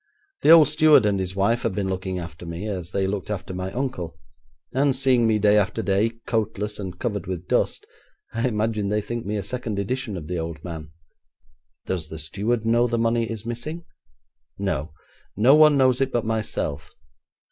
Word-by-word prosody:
The -, -, +3 dB
old 160 Hz, -3 st, +9 dB
steward 150 Hz, -5 st, +5 dB
and 100 Hz, -2 st, +1 dB
his 95 Hz, 0 st, -3 dB
wife 115 Hz, +5 st, +2 dB
have 110 Hz, -5 st, -1 dB
been 100 Hz, -2 st, -1 dB
looking 95 Hz, 0 st, -3 dB
after 85 Hz, -1 st, -7 dB
me, 85 Hz, +3 st, -6 dB
as 90 Hz, -4 st, -5 dB
they 95 Hz, 0 st, 0 dB
looked 95 Hz, +1 st, -3 dB
after 100 Hz, -2 st, -4 dB
my 90 Hz, +1 st, -4 dB
uncle, 120 Hz, -11 st, -4 dB, 0.6 s
and, 135 Hz, 0 st, +2 dB
seeing 130 Hz, -3 st, +3 dB
me 110 Hz, -1 st, +3 dB
day 105 Hz, 0 st, +4 dB
after 100 Hz, 0 st, -1 dB
day, 100 Hz, +4 st, +2 dB, 0.2 s
coatless, 105 Hz, -2 st, -2 dB
and 95 Hz, -3 st, -6 dB
covered 105 Hz, -2 st, -3 dB
with 90 Hz, -1 st, -5 dB
dust, -, -, 0 dB, 0.5 s
I 115 Hz, +2 st, 0 dB
imagine 110 Hz, -2 st, -1 dB
they 105 Hz, +1 st, +1 dB
think 120 Hz, 0 st, -5 dB
me 105 Hz, -, -1 dB
a 100 Hz, -, -3 dB
second 115 Hz, 0 st, -3 dB
edition 105 Hz, 0 st, -2 dB
of 80 Hz, -, -7 dB
the 90 Hz, 0 st, -2 dB
old 80 Hz, -1 st, -5 dB
man.' 80 Hz, -3 st, -7 dB, 1.0 s
'Does 85 Hz, -4 st, -3 dB
the 80 Hz, -, -7 dB
steward 105 Hz, +9 st, -2 dB
know 120 Hz, +2 st, +3 dB
the 120 Hz, 0 st, -1 dB
money 115 Hz, 0 st, +1 dB
is 110 Hz, -1 st, -5 dB
missing?' 150 Hz, +9 st, -5 dB, 0.7 s
'No; 85 Hz, -6 st, -2 dB, 0.5 s
no 120 Hz, +6 st, +6 dB
one 150 Hz, -1 st, +7 dB
knows 130 Hz, -1 st, +3 dB
it 135 Hz, 0 st, +1 dB
but 120 Hz, -2 st, 0 dB
myself. 110 Hz, -10 st, -3 dB
105 Hz, 190 wpm, -24 LUFS, 95-120 Hz, 1.0 s, old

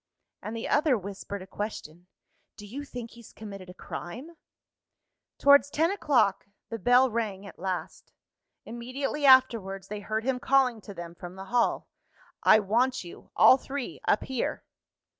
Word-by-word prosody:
And 225 Hz, +2 st, -5 dB
the 225 Hz, -, -4 dB
other 290 Hz, -3 st, +3 dB
whispered 200 Hz, 0 st, -7 dB
a -, -, -11 dB
question: 180 Hz, -4 st, -7 dB, 0.5 s
"Do 205 Hz, -, -10 dB
you 270 Hz, +8 st, -7 dB
think 245 Hz, -4 st, -8 dB
he's 235 Hz, -2 st, -14 dB
committed 195 Hz, -4 st, -10 dB
a 180 Hz, -, -11 dB
crime?" 245 Hz, -, -8 dB, 1.1 s
Towards 285 Hz, 0 st, +6 dB
ten 320 Hz, +4 st, +1 dB
o'clock, 245 Hz, -, +1 dB, 0.2 s
the 230 Hz, -, -5 dB
bell 245 Hz, +4 st, +4 dB
rang 210 Hz, -4 st, -3 dB
at -, -, -12 dB
last. 185 Hz, 0 st, -5 dB, 0.5 s
Immediately 260 Hz, +5 st, -3 dB
afterwards 220 Hz, -8 st, +4 dB
they 210 Hz, 0 st, -5 dB
heard 215 Hz, +2 st, -3 dB
him 260 Hz, 0 st, -1 dB
calling 255 Hz, -4 st, +2 dB
to 200 Hz, -1 st, -10 dB
them 170 Hz, -1 st, -8 dB
from 175 Hz, +1 st, -10 dB
the 190 Hz, 0 st, -8 dB
hall. 240 Hz, -1 st, +1 dB, 0.5 s
"I -, -, +7 dB
want 235 Hz, +5 st, +1 dB
you, 175 Hz, -, -12 dB
all 255 Hz, -, +7 dB
three, 275 Hz, -1 st, -6 dB
up -, -, +3 dB
here." 260 Hz, -3 st, -3 dB
225 Hz, 155 wpm, -28 LUFS, 195-260 Hz, 1.1 s, I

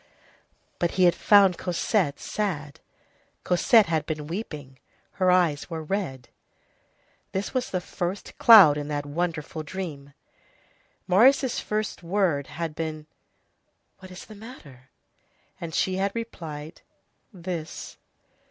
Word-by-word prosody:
But 175 Hz, -, +1 dB
he 185 Hz, -, +4 dB
had 175 Hz, -1 st, +6 dB
found 195 Hz, -4 st, +5 dB
Cosette 180 Hz, -3 st, 0 dB
sad; 155 Hz, -9 st, -4 dB, 0.6 s
Cosette 215 Hz, +5 st, +4 dB
had 160 Hz, -4 st, -1 dB
been 155 Hz, -2 st, -4 dB
weeping. 150 Hz, -, -7 dB, 0.4 s
Her 185 Hz, -, +4 dB
eyes 175 Hz, -5 st, +2 dB
were 160 Hz, -2 st, -5 dB
red. 150 Hz, -8 st, -4 dB, 1.0 s
This 190 Hz, +2 st, -3 dB
was 255 Hz, -1 st, -1 dB
the 185 Hz, -, -1 dB
first 180 Hz, +2 st, -5 dB
cloud 190 Hz, -11 st, +8 dB
in 145 Hz, -, -5 dB
that 145 Hz, -1 st, -3 dB
wonderful 160 Hz, 0 st, -3 dB
dream. 150 Hz, -4 st, -7 dB, 0.9 s
Marius' 250 Hz, +7 st, +4 dB
first 215 Hz, -2 st, -3 dB
word 170 Hz, -6 st, 0 dB
had 165 Hz, -2 st, -5 dB
been: 155 Hz, -1 st, -5 dB, 0.9 s
"What 185 Hz, -, -12 dB
is 185 Hz, 0 st, -10 dB
the 215 Hz, -, -12 dB
matter?" 160 Hz, -, -13 dB, 0.7 s
And 165 Hz, -2 st, -6 dB
she 185 Hz, 0 st, 0 dB
had 195 Hz, +1 st, 0 dB
replied: 160 Hz, -9 st, -7 dB, 0.5 s
"This." 175 Hz, -4 st, -6 dB
175 Hz, 120 wpm, -25 LUFS, 150-195 Hz, 1.0 s, cloud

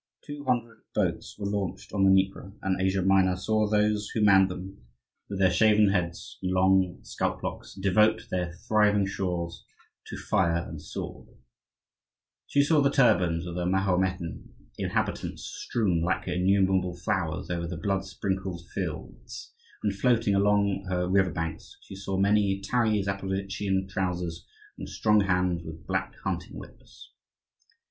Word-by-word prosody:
Two 145 Hz, -1 st, -7 dB
hundred 120 Hz, -3 st, -1 dB, 0.2 s
boats -, -, -1 dB
were 100 Hz, -, -5 dB
launched 100 Hz, -2 st, -3 dB
on 100 Hz, -2 st, +2 dB
the 95 Hz, -, +6 dB
Dnieper, 95 Hz, 0 st, +1 dB
and 95 Hz, -1 st, 0 dB
Asia 95 Hz, 0 st, +1 dB
Minor 95 Hz, -1 st, +4 dB
saw 110 Hz, +3 st, +1 dB
those 105 Hz, 0 st, +1 dB
who 110 Hz, -, -2 dB
manned 95 Hz, -2 st, +6 dB
them, 90 Hz, -6 st, -8 dB, 0.5 s
with 100 Hz, -, -4 dB
their 95 Hz, -1 st, +4 dB
shaven 105 Hz, +2 st, +5 dB
heads 85 Hz, -3 st, -2 dB
and 90 Hz, -, -1 dB
long 95 Hz, -1 st, +3 dB
scalp -, -, -3 dB
locks, -, -, -6 dB
devote 100 Hz, +3 st, +3 dB
her 90 Hz, -1 st, -1 dB, 0.2 s
thriving 105 Hz, -2 st, +4 dB
shores 90 Hz, -3 st, -3 dB, 0.4 s
to -, -, -6 dB
fire 85 Hz, -5 st, 0 dB
and -, -, -8 dB
sword; -, -, -7 dB, 1.2 s
she 140 Hz, -, +3 dB
saw 150 Hz, 0 st, +3 dB
the 140 Hz, -, +4 dB
turbans 90 Hz, -, +3 dB
of 85 Hz, -1 st, -6 dB
her 90 Hz, 0 st, -1 dB
Mahometan 90 Hz, -2 st, 0 dB, 0.3 s
inhabitants -, -, -2 dB
strewn, 95 Hz, -8 st, -1 dB
like 90 Hz, +3 st, 0 dB
her 90 Hz, -, -2 dB
innumerable 95 Hz, -1 st, +2 dB
flowers, 90 Hz, -3 st, -2 dB
over 85 Hz, -1 st, -2 dB
the 85 Hz, -1 st, -5 dB
blood 95 Hz, +4 st, -1 dB
sprinkled 95 Hz, -3 st, -4 dB
fields, -, -, -6 dB, 0.3 s
and 105 Hz, -2 st, +1 dB
floating 115 Hz, 0 st, +2 dB
along 100 Hz, -1 st, +2 dB
her 90 Hz, -1 st, 0 dB
river 95 Hz, 0 st, +3 dB
banks; 80 Hz, -1 st, -5 dB
she -, -, -11 dB
saw 95 Hz, 0 st, -3 dB
many 100 Hz, 0 st, +2 dB
tarry 110 Hz, +1 st, +1 dB
Zaporozhian 95 Hz, 0 st, -2 dB
trousers, 90 Hz, -3 st, -3 dB, 0.3 s
and -, -, -6 dB
strong 105 Hz, -1 st, +3 dB
hands 90 Hz, -3 st, +1 dB
with 80 Hz, -1 st, -9 dB
black -, -, -2 dB
hunting -, -, -4 dB
whips. -, -, -14 dB
95 Hz, 150 wpm, -27 LUFS, 90-105 Hz, 1.2 s, the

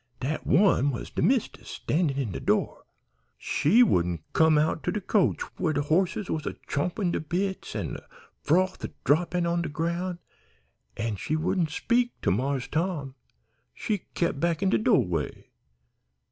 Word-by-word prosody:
Dat 150 Hz, +5 st, -3 dB
one 160 Hz, -4 st, +4 dB
was 125 Hz, -, -5 dB
de -, -, -2 dB
mist'ess, 255 Hz, -3 st, 0 dB
standin' 150 Hz, -4 st, -1 dB
in 130 Hz, -7 st, -1 dB
de -, -, -4 dB
door. -, -, 0 dB, 0.5 s
She 220 Hz, +12 st, +4 dB
wouldn't 85 Hz, -, +1 dB
come 160 Hz, -1 st, +5 dB
out 155 Hz, +1 st, +1 dB
to -, -, -1 dB
de 210 Hz, -, -2 dB
coach 200 Hz, 0 st, +1 dB, 0.2 s
where 160 Hz, -3 st, +1 dB
de 145 Hz, 0 st, 0 dB
horses 180 Hz, +6 st, +1 dB
was 155 Hz, -, -3 dB
a -, -, -3 dB
champin' 175 Hz, +5 st, -1 dB
de -, -, -1 dB
bits 185 Hz, +5 st, -3 dB
an' -, -, -3 dB
de -, -, -9 dB, 0.3 s
froth 185 Hz, +4 st, +1 dB
a -, -, -3 dB
droppin' 175 Hz, +3 st, +2 dB
on 170 Hz, 0 st, +1 dB
de 170 Hz, -, -3 dB
groun', 170 Hz, +3 st, -2 dB, 0.8 s
an' 110 Hz, -2 st, -2 dB
she 155 Hz, -, -2 dB
wouldn't 165 Hz, +1 st, 0 dB
speak 240 Hz, +10 st, 0 dB
to -, -, +2 dB
Marse 130 Hz, +5 st, -1 dB
Tom. 160 Hz, -5 st, -2 dB, 0.6 s
She 210 Hz, -2 st, -1 dB, 0.2 s
kep' 170 Hz, -5 st, 0 dB
back 170 Hz, +2 st, 0 dB
in 195 Hz, -, +2 dB
de -, -, +3 dB
do'way. 90 Hz, -, 0 dB
165 Hz, 165 wpm, -27 LUFS, 145-185 Hz, 0.8 s, come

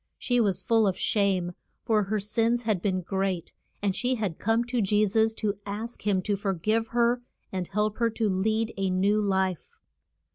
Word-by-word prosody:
She 245 Hz, -2 st, +1 dB
was 200 Hz, -5 st, +1 dB
full 225 Hz, -2 st, +3 dB
of 185 Hz, -, 0 dB
shame, 195 Hz, -4 st, +1 dB, 0.3 s
for 215 Hz, -3 st, +2 dB
her 215 Hz, +2 st, -1 dB
sins 230 Hz, +4 st, +1 dB
had 215 Hz, -6 st, 0 dB
been 185 Hz, -2 st, 0 dB
great, 190 Hz, -1 st, -2 dB, 0.3 s
and 195 Hz, -2 st, +1 dB
she 250 Hz, +3 st, 0 dB
had 205 Hz, -8 st, -3 dB
come 225 Hz, +2 st, +2 dB
to 245 Hz, -1 st, -1 dB
Je 210 Hz, +1 st, +3 dB
sus 220 Hz, +2 st, +2 dB
to 205 Hz, -3 st, -2 dB
ask 210 Hz, +2 st, -5 dB
him 190 Hz, -2 st, +2 dB
to 205 Hz, -, 0 dB
for 195 Hz, -1 st, -1 dB
give 220 Hz, +6 st, 0 dB
her 240 Hz, +1 st, +2 dB, 0.3 s
and 185 Hz, -2 st, -3 dB
help 210 Hz, +1 st, -1 dB
her 230 Hz, -1 st, +3 dB
to 225 Hz, 0 st, -1 dB
lead 215 Hz, +4 st, 0 dB
a 195 Hz, -1 st, 0 dB
new 200 Hz, +3 st, +2 dB
life. 190 Hz, -3 st, -1 dB
210 Hz, 190 wpm, -27 LUFS, 190-225 Hz, 0.3 s, full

